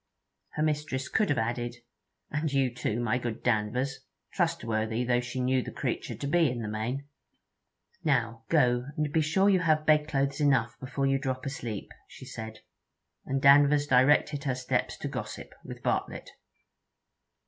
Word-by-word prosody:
Her 150 Hz, -, -1 dB
mistress 150 Hz, -3 st, -1 dB
could 215 Hz, -2 st, +1 dB
have 145 Hz, -, +1 dB
added, 120 Hz, +1 st, -2 dB, 0.6 s
'And 150 Hz, 0 st, -1 dB
you 135 Hz, -3 st, +1 dB
too, 120 Hz, -2 st, -2 dB
my 120 Hz, +1 st, 0 dB
good 120 Hz, -2 st, -5 dB
Danvers!' 125 Hz, +4 st, 0 dB, 0.3 s
trustworthy 110 Hz, +1 st, 0 dB
though 120 Hz, 0 st, +2 dB
she 125 Hz, +1 st, -5 dB
knew 130 Hz, +1 st, +2 dB
the -, -, -6 dB
creature -, -, -3 dB
to -, -, -6 dB
be 160 Hz, +1 st, +3 dB
in 120 Hz, -2 st, -4 dB
the -, -, -4 dB
main. 115 Hz, +7 st, -3 dB, 1.0 s
'Now 115 Hz, -6 st, 0 dB
go, 125 Hz, -5 st, +3 dB
and 150 Hz, -1 st, -1 dB
be 160 Hz, -, +3 dB
sure 180 Hz, +6 st, +2 dB
you 195 Hz, -2 st, +5 dB
have 155 Hz, -3 st, +2 dB
bedclothes 150 Hz, -2 st, +2 dB
enough 125 Hz, -6 st, +2 dB
before 135 Hz, +1 st, -2 dB
you 135 Hz, 0 st, +2 dB
drop 130 Hz, -1 st, -3 dB
asleep,' 120 Hz, -6 st, -5 dB, 0.2 s
she -, -, -12 dB
said; 110 Hz, 0 st, -8 dB, 0.7 s
and 135 Hz, 0 st, -1 dB
Danvers 145 Hz, +1 st, +6 dB
directed 145 Hz, +2 st, +3 dB
her 130 Hz, -2 st, 0 dB
steps 125 Hz, 0 st, -1 dB
to -, -, -4 dB
gossip -, -, -6 dB
with -, -, -9 dB
Bartlett. -, -, -2 dB
130 Hz, 160 wpm, -29 LUFS, 120-145 Hz, 1.0 s, Danvers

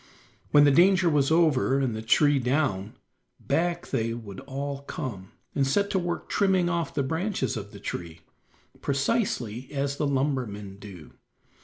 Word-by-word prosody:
When 145 Hz, -, +6 dB
the 145 Hz, -, +6 dB
danger 185 Hz, +4 st, +5 dB
was 140 Hz, -2 st, +2 dB
over 155 Hz, -5 st, +3 dB
and 130 Hz, -5 st, 0 dB
the 110 Hz, -, -4 dB
tree 145 Hz, +5 st, +4 dB
down, 125 Hz, -6 st, 0 dB, 0.4 s
back 175 Hz, +1 st, -1 dB
they 115 Hz, 0 st, -1 dB
would 105 Hz, -5 st, -8 dB
all 140 Hz, +1 st, -5 dB
come, 120 Hz, -10 st, -6 dB, 0.2 s
and 135 Hz, -2 st, +1 dB
set 200 Hz, +9 st, +1 dB
to 190 Hz, -, +2 dB
work 175 Hz, -1 st, -3 dB
trimming 190 Hz, -3 st, +2 dB
off 170 Hz, -2 st, -2 dB
the 140 Hz, -, +1 dB
branches 160 Hz, 0 st, -1 dB
of 100 Hz, -2 st, -6 dB
the 100 Hz, -, -11 dB
tree, 85 Hz, -4 st, -6 dB, 0.6 s
precisely 135 Hz, -, -1 dB
as 140 Hz, 0 st, -2 dB
the 150 Hz, -, 0 dB
lumbermen 125 Hz, -8 st, -2 dB
do. 95 Hz, -7 st, -11 dB
140 Hz, 155 wpm, -27 LUFS, 115-160 Hz, 0.6 s, When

